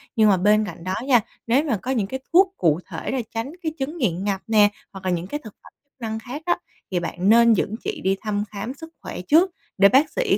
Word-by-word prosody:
Nhưng 220 -2 +5
mà 190 - +4
bên 210 +3 +3
cạnh 170 -3 -9
đó 185 +1 -2
nha, 245 -5 +5 0.3
nếu 255 +6 +3
mà 270 -9 0
có 250 +7 -4
những 220 -7 0
cái 265 +3 -4
thuốc 380 +2 +5
cụ 160 -1 +2
thể - - -4
để 260 -3 -1
tránh 230 +5 -3
cái 315 - -1
chứng 295 +6 -3
nghiện 190 - 0
ngập 195 -2 -1
nè, 210 -2 +5 0.2
hoặc 190 -1 -10
là 185 - +1
những 175 0 -2
cái 295 - -4
thực 215 - -11
phẩm - - -16
chức 280 - -51
năng 220 -1 -3
khác 255 +6 -7
á, 350 - +2 0.3
thì 180 - +1
bạn 175 +3 -1
nên 235 +1 +7
dẫn 210 +1 0
chị - - -4
đi 190 +1 +2
thăm 205 -1 -1
khám 215 +5 -5
sức 325 +3 -12
khỏe - - -6
trước, 330 - +4 0.3
để 200 0 +7
bác 275 +6 +4
sĩ - - +1
220 Hz, 260 wpm, -23 LUFS, 195-265 Hz, 0.3 s, nên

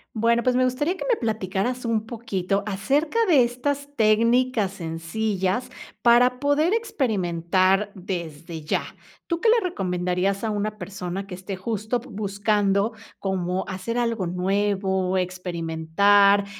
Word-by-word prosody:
Bueno, 235 +2 +2
pues 250 +1 +2
me 255 - +3
gustaría 270 +8 0
que - - -6
me 485 - +4
platicaras 220 +2 -2
un 225 -2 0
poquito 200 -4 -2
acerca 280 - 0
de 295 -8 +6
estas 280 +4 -2
técnicas 230 -1 +3
sencillas 190 +6 -2 0.3
para 245 +1 +5
poder 285 +4 +2
experimentar 195 - +1
desde 170 -4 -6
ya. 150 - 0 0.4
¿Tú 335 -1 -2
qué 450 - +4
le 465 +1 +5
recomendarías 185 - -1
a 220 - 0
una 210 +1 -2
persona 190 -1 -5
que 195 - -9
esté 190 +2 -6
justo, 220 +4 -2
p 255 +3 -14
buscando 205 +1 +1 0.2
como 185 -1 -2
hacer 195 +5 -4
algo 230 -6 0
nuevo, 190 0 0
experimentar, 180 +3 +2
205 Hz, 130 wpm, -24 LUFS, 185-240 Hz, 0.4 s, de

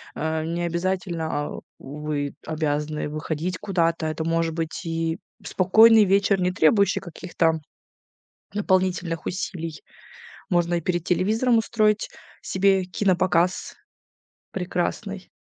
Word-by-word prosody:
А, 160 0 -1
не 170 +2 -2
обязательно 170 -1 -2
а 145 -1 -3 0.2
вы 145 0 -4
обязаны 150 -1 -2
выходить 160 +4 -3
куда-то. 170 -5 0
Это 155 0 -3
может 165 0 0
быть 165 -1 -4
и 165 +1 -2 0.2
спокойный 220 +4 +6
вечер, 195 0 +3
не 180 0 +2
требующий 195 +4 +3
каких-то 165 -2 -1 1.0
дополнительных 185 -5 0
усилий. 165 -4 -4 0.7
Можно 175 -1 +2
и 170 - -1
перед 175 0 -1
телевизором 220 +7 +2
устроить 215 -2 +1 0.3
себе 195 0 +2
кинопоказ 180 -2 +1 0.8
прекрасный. 185 +2 -3
175 Hz, 105 wpm, -24 LUFS, 160-190 Hz, 1.0 s, спокойный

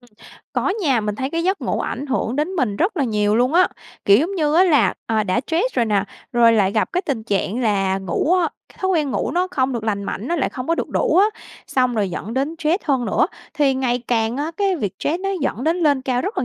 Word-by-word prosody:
Ừm, 245 - -22 0.4
có - - 0
nha, 270 -8 +2
mình 210 -1 -2
thấy 265 +4 -3
cái 330 0 -1
giấc 380 +2 0
ngủ - - -1
ảnh 285 - -4
hưởng 260 -1 -1
đến 300 +3 0
mình 225 -9 0
rất 365 - 0
là 285 - +1
nhiều 210 -2 +1
luôn 250 +5 +2
á. 365 +1 +5 0.4
Kiểu 200 +2 +6
giống 350 +7 -1
như 305 -4 +1
á 360 +3 +6
là, 285 - +3
à, 220 -1 +1
đã 185 +6 +1
stress 340 - -1
rồi 240 - +2
nè, 205 -3 +1 0.3
rồi 235 -1 +5
lại 200 -3 +2
gặp 215 - 0
cái 360 +2 0
tình 260 -7 -3
trạng 205 +2 -1
là 195 -4 +1
ngủ 195 - 0
á, 345 -3 +2 0.3
thói 380 0 0
quen 305 -6 +1
ngủ - - -1
nó 360 +2 +1
không 260 0 0
được 230 -3 -3
lành 200 -2 -1
mạnh, 210 +5 -4
nó 345 - 0
lại - - 0
không 255 -1 -6
có 335 - +3
được - - -3
đủ - - +1
á, 395 +3 +6 0.4
xong 255 -2 +1
rồi 205 -4 0
dẫn 215 +6 -5
đến 280 +5 -1
stress 330 +4 0
hơn 270 -5 +1
nữa. - - +2 0.3
Thì 285 -3 +2
ngày 250 -2 -1
càng 225 0 +1
á, 295 +3 -2
cái 395 -2 +1
việc 205 - -3
stress 330 +4 -1
nó 390 - -2
dẫn 260 -1 -2
đến 325 +2 +2
lên 290 -6 +2
cao 250 -2 0
rất 395 +5 -3
là - - 0
260 Hz, 265 wpm, -21 LUFS, 220-325 Hz, 0.4 s, Kiểu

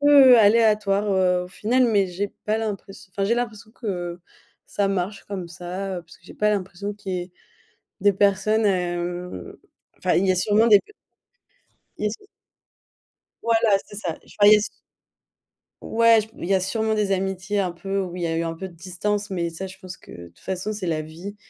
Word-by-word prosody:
peu 280 -4 +8
aléatoire, 210 -2 +4
heu, 180 -1 +2
au - - -11
final, 245 +7 +1
mais 205 -5 +3
j'ai 195 +3 -4
pas 215 +1 +2
l'impress 200 -3 -5
enfin 195 +1 -2
j'ai 230 +4 +2
l'impression 225 -3 -4
que 180 -7 -4 0.5
ça 200 -1 -1
marche 195 +1 -2
comme 190 -4 -5
ça, 180 +2 -5
heu, - - -9
parce 165 - -17
que 170 - -31
j'ai - - -12
pas 210 - +1
l'impression 200 0 -2
qu'il 200 -2 -6
y 180 - -1
ait 180 - -20 0.7
des 205 -1 +5
personnes, 205 +3 +2
hem, 175 - -2 0.4
enfin - - 0
il 190 - +3
y 185 - +4
a - - 0
sûrement 210 +4 +3
des 210 -3 +8
p 425 - -21 1.1
il - - -4
y - - +4
a - - 0
su 405 - -10 1.2
Voilà, 225 -3 +3
c'est 205 - -11
ça. 170 -6 -3
Je - - -17
vois, 205 - +7
il 210 - +10
y - - +8
a - - +2
su - - -2 1.1
Ouais, 230 0 +4
j 215 - -9
il - - -4
y 195 - +4
a - - +3
sûrement 220 +3 0
des 205 -2 0
amitiés 195 +1 -1
un 185 -3 0
peu 195 +3 -3
où 180 -2 -5
il 175 - -4
y - - +1
a 165 - -1
eu 165 - 0
un 165 0 -3
peu 190 +3 -6
de 175 - -14
distance, 200 +4 -3
mais 170 -3 -2
ça 190 +4 -6
je 185 - -12
pense 185 -1 -9
que - - -17
de 85 0 -10
toute 85 0 -22
façon 190 - -3
c'est 190 -4 -4
la 155 -2 0
vie 175 +6 -9
195 Hz, 220 wpm, -23 LUFS, 180-210 Hz, 1.2 s, il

